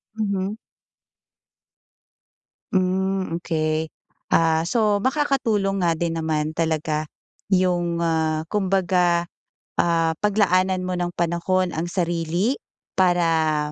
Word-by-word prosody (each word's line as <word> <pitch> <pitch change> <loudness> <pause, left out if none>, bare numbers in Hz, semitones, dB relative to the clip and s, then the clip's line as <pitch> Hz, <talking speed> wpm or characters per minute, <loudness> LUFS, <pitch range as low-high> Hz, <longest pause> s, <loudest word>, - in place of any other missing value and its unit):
Mhm. 200 -2 -1 2.2
Hmm, 190 -1 0
okey. 155 -1 -1 0.4
Ah, 160 -1 +3
so 210 +2 +1
makakatulong 225 -9 +1
nga 170 - +3
din 170 0 -1
naman 155 -1 -1
talaga 155 -1 -1 0.5
yung, 175 -2 +1
ah, 160 -1 0
kumbaga, 180 -3 +1 0.5
ah, 165 -1 +2
paglaanan 185 -3 +2
mo 185 - -2
ng 175 -1 -2
panahon 175 +2 0
ang 165 +2 -3
sarili 175 - 0 0.4
para 165 -4 +2
175 Hz, 90 wpm, -23 LUFS, 165-190 Hz, 2.2 s, Ah